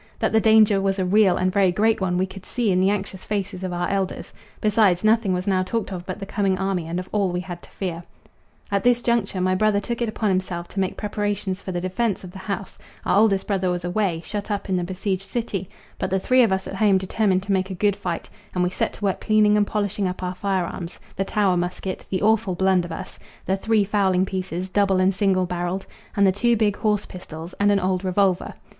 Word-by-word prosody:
That - - 0
the 220 - +4
danger 215 -2 +5
was 195 0 0
a 190 - 0
real 195 0 +4
and 185 0 0
very 195 -3 +4
great 220 +3 +2
one 180 -1 0
we 185 - +2
could 190 0 -11
see 235 -2 0
in 180 - +2
the 190 - +4
anxious 195 -2 -3
faces 195 -2 -3
of 185 - -2
our 175 0 -1
elders; 195 -1 -2 0.3
besides, 210 -4 +3
nothing 215 -2 +3
was 180 0 -1
now 190 -2 +2
talked 200 +2 -2
of 180 -1 -7
but 185 - -4
the 195 - -5
coming 195 -1 0
army 190 -3 -1
and 170 +2 -2
of 185 - -6
all 200 -3 +1
we 180 0 -2
had 175 -1 -7
to - - -15
fear. 175 -4 -4 0.7
At 200 -1 +2
this 245 -1 +4
juncture 230 -5 0
my 185 0 +2
brother 205 +2 +2
took 235 +3 -4
it 235 - +1
upon 215 -1 -1
himself 185 -2 -1
to 200 - -4
make 190 -1 -1
preparations 205 -2 -2
for 185 - -5
the 175 - -2
defence 190 +4 -1
of 180 - -9
the 190 - -10
house 195 0 -5 0.3
Our - - +2
oldest 200 -2 +3
brother 190 -3 0
was 180 0 -2
away, 175 -3 0
shut 205 +3 -4
up 205 -1 -3
in 190 - +1
the 180 - 0
besieged 190 +1 -3
city, 200 -6 -3 0.3
but - - -1
the 190 - +1
three 255 +6 +4
of 230 -5 +4
us 190 0 0
at 195 - -6
home 200 -2 +4
determined 190 0 +1
to 200 - -3
make 190 0 +1
a 190 - -4
good 205 +1 +2
fight, 180 -4 -4 0.3
and 180 - +2
we 180 - 0
set - - -1
to 205 - -5
work 195 - 0
cleaning 215 -1 +4
and 205 -1 +3
polishing 205 -2 -1
up 180 0 -5
our 180 0 -2
firearms 185 -2 -3 0.2
the 195 - 0
Tower 195 -3 +2
musket, 180 +2 -3
the 185 - -1
awful 215 -3 +2
blunderbuss, 185 -1 0 0.3
the 190 - +1
three 215 +1 +2
fowling 190 -2 +2
pieces, 185 -1 -4
double 195 -1 +2
and 185 +1 +3
single 190 -2 +2
barrelled, 180 +1 -3 0.3
and 200 - +5
the 190 - +5
two 235 +4 +2
big 210 -2 +1
horse 210 -2 +1
pistols 165 -1 -9
and 205 0 +4
an 200 - +3
old 185 0 0
revolver. 185 -1 +1
190 Hz, 240 wpm, -23 LUFS, 185-205 Hz, 0.7 s, danger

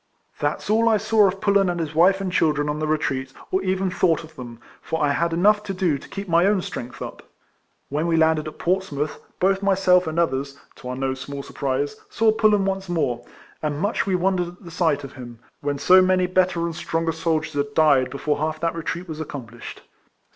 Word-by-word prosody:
That - - -1
's - - -9
all 230 +1 +4
I 220 - +4
saw 215 0 +4
of 195 +1 -2
Pullen, 200 -2 +3
and 175 -1 -2
his 160 -2 -3
wife 185 +5 +4
and 190 -2 -3
children, 150 -4 +1
on 150 +1 -2
the 155 - -1
retreat, 135 -4 -1 0.2
or 190 - +1
even 190 0 0
thought 170 -3 +1
of 160 0 -14
them; 120 -4 -9 0.2
for 160 - -3
I 145 -2 +2
had 170 +4 0
enough 205 +5 +3
to 195 -2 -4
do 175 -7 +1
to - - -14
keep 195 0 -6
my 170 +2 +4
own 200 -3 +2
strength 125 +1 -6
up. - - -8 0.7
When 150 +4 -1
we 165 -1 +2
landed 160 -1 +2
at 155 - -8
Portsmouth, 170 -5 -1 0.2
both 195 +1 +2
myself 185 -3 +3
and 160 +1 -3
others 140 -4 0 0.2
(to 125 - -8
our 125 - -3
no 135 0 -1
small 140 +1 -7
surprise), 140 +7 -2
saw 225 -1 +3
Pullen 215 -2 +3
once 195 -1 -2
more; 145 -9 -1 0.4
and 150 -2 -2
much 200 +2 0
we 190 - +2
wondered 180 -1 +1
at 175 +3 -13
the 170 - -10
sight 160 -4 +1
of 140 - -8
him, 120 -3 -10 0.2
when 145 0 -2
so 185 +6 +6
many 185 0 +3
better 185 -1 +1
and 170 -1 -4
stronger 165 0 -1
soldiers 160 -1 -1
had 145 0 -2
died 145 -5 +4
before 145 +1 -2
half 155 +1 -1
of 155 - -19
that 165 -1 0
retreat 170 +2 -4
was 160 -2 -6
accomplished. 120 -6 -8
165 Hz, 220 wpm, -23 LUFS, 145-185 Hz, 0.7 s, so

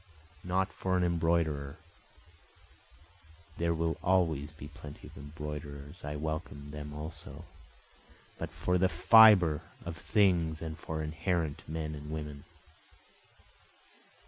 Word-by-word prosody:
Not 95 +2 0
for 95 -1 0
an 90 - +2
embroiderer, 80 -4 +1 1.8
(There 85 0 +1
will 80 0 0
always 80 -6 +2
be 75 -2 -10
plenty 75 -1 -11
of - - -14
embroiderers, 75 +1 -7
I 75 +1 -4
welcome 75 -1 -4
them 75 0 -6
also,) 75 0 -7 0.9
But - - -3
for 90 0 0
the 95 +1 +4
fibre 105 -9 +7 0.2
of 85 -1 -4
things 85 -6 +2
and 80 -1 -5
for 80 0 -4
inherent 80 0 -1
men 80 -1 -3
and 75 0 -8
women. 75 -2 -6
80 Hz, 115 wpm, -31 LUFS, 75-85 Hz, 1.8 s, fibre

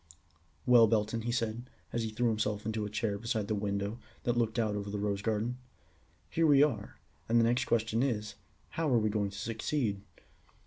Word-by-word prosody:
"Well, 120 -2 +7
Belton," 110 +1 +1
he 120 +2 -2
said, 115 +1 -2 0.2
as 120 - 0
he 110 - -2
threw 115 +2 +1
himself 105 -1 -1
into 110 -1 -2
a - - -7
chair 105 -1 -1
beside 110 -2 -2
the 110 - 0
window 100 +2 -2 0.2
that 120 - +1
looked 115 -1 0
out 110 -3 +1
over 100 0 -4
the 105 - -3
rose 100 -1 -1
garden, 115 +3 -1 0.7
"here 165 0 +2
we 145 -1 +7
are, 110 -9 -1 0.3
and 115 +1 +5
the - - +5
next 120 +3 +2
question 115 -1 +1
is, 110 -6 -1 0.4
how 165 -2 -1
are 120 - +5
we 110 -1 +1
going 105 -1 0
to 100 - -10
succeed?" 110 0 -1
110 Hz, 195 wpm, -31 LUFS, 105-120 Hz, 0.7 s, Well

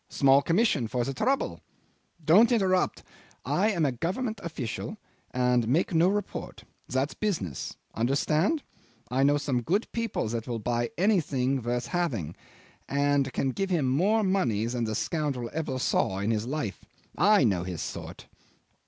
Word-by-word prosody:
Small 140 0 +5
commission 165 - +2
for 125 +1 -1
the 135 - -3
trouble. 260 - 0 0.6
Don't 210 +10 +6
interrupt. 190 -5 +1 0.4
I 205 +4 +2
am 170 -7 +1
a 140 - +2
Government 200 - -3
official, 155 - -5 0.3
and 125 -2 +1
make 155 +9 +1
no 165 +2 +4
report. 205 0 -4 0.3
That's 130 +3 0
business. 155 - -3 0.2
Understand? 150 - +1 0.5
I 130 +2 +1
know 145 +1 +4
some 135 -4 -1
good 190 - 0
people 230 - -2
that 115 0 -4
will 120 -2 -2
buy 120 +1 -1
anything 145 -10 +1
worth 120 +1 -2
having, 120 - -2 0.5
and 140 -1 +1
can 135 - 0
give 195 +8 -2
him 165 -7 +1
more 195 +12 +2
money 130 - +1
than 120 0 -1
the 110 0 -2
scoundrel 140 -5 -2
ever 155 -4 -2
saw 95 -6 +1
in 100 +3 0
his 110 +1 -1
life. 135 -7 -3 0.3
I 205 +1 +5
know 95 -7 +2
his 90 -2 -4
sort." - - -7
140 Hz, 155 wpm, -28 LUFS, 120-185 Hz, 0.6 s, Don't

